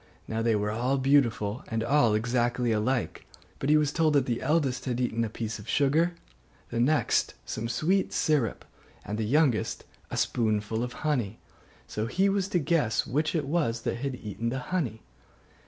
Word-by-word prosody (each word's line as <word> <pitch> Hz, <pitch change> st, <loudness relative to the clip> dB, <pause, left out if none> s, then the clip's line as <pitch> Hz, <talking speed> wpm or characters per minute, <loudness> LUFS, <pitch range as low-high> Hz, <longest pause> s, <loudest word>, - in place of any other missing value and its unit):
Now 110 Hz, 0 st, -2 dB
they 115 Hz, -1 st, +2 dB
were 105 Hz, 0 st, 0 dB
all 125 Hz, +5 st, 0 dB
beautiful, 130 Hz, -3 st, +2 dB
and 110 Hz, -1 st, -2 dB
all 120 Hz, -3 st, +3 dB
exactly 120 Hz, +1 st, +1 dB
alike: 115 Hz, +3 st, -1 dB, 0.3 s
but 135 Hz, -, -1 dB
he 155 Hz, -, +6 dB
was 150 Hz, -1 st, +2 dB
told 155 Hz, -1 st, +2 dB
that 140 Hz, -3 st, +3 dB
the 120 Hz, -2 st, -2 dB
eldest 140 Hz, -3 st, +1 dB
had 125 Hz, -2 st, -1 dB
eaten 115 Hz, -2 st, 0 dB
a 115 Hz, -, -2 dB
piece 110 Hz, 0 st, -4 dB
of 105 Hz, -, -11 dB
sugar, 155 Hz, +5 st, +2 dB, 0.6 s
the 115 Hz, -, -1 dB
next 145 Hz, +6 st, +2 dB
some 115 Hz, +1 st, -4 dB
sweet 180 Hz, +11 st, +1 dB
syrup, 145 Hz, -9 st, 0 dB, 0.4 s
and 105 Hz, +2 st, -4 dB
the -, -, 0 dB
youngest 135 Hz, -1 st, +1 dB, 0.3 s
a -, -, -4 dB
spoonful 110 Hz, -1 st, 0 dB
of 125 Hz, 0 st, -2 dB
honey; 120 Hz, -9 st, 0 dB, 0.5 s
so 110 Hz, +1 st, -3 dB
he 190 Hz, +10 st, +2 dB
was 195 Hz, -1 st, 0 dB
to 185 Hz, -, 0 dB
guess 145 Hz, -8 st, +1 dB
which 155 Hz, +6 st, 0 dB
it 155 Hz, -4 st, 0 dB
was 140 Hz, -7 st, 0 dB
that 115 Hz, -, -2 dB
had 135 Hz, +1 st, -3 dB
eaten 110 Hz, 0 st, -4 dB
the 130 Hz, -, -2 dB, 0.2 s
honey. 120 Hz, -, -1 dB
125 Hz, 180 wpm, -28 LUFS, 115-150 Hz, 0.6 s, he